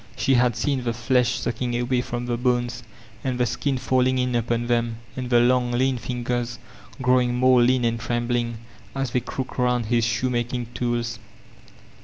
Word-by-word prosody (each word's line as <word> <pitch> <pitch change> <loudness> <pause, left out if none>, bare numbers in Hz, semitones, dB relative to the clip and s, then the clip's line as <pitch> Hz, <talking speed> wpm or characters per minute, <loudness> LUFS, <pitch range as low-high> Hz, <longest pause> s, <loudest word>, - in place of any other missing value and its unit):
She 135 - +2
had 125 -2 +3
seen 130 +2 -1
the 120 -1 -1
flesh 125 +1 +1
sock* 120 0 -3
ing 120 -1 -1
away 125 0 +1
from 120 0 -4
the 120 -1 -1
bones, 120 -1 0 0.4
and 130 -2 -2
the 125 - +3
skin 135 +4 -1
falling 130 0 +2
in 125 0 0
upon 120 0 0
them, 120 -1 0 0.2
and 125 -1 -4
the 120 -1 +5
long, 125 0 +3
lean 130 +1 +1
fingers 120 0 -3 0.5
growing 125 -1 +3
more 130 0 +5
lean 125 0 +3
and 115 0 0
trembling, 120 0 -1 0.4
as 135 -3 -2
they 125 - +2
crooked 130 +2 -6
round 125 -1 +2
his 120 +1 +1
shoemaking 120 0 -1
tools. 120 -1 -2
120 Hz, 175 wpm, -24 LUFS, 120-125 Hz, 0.5 s, the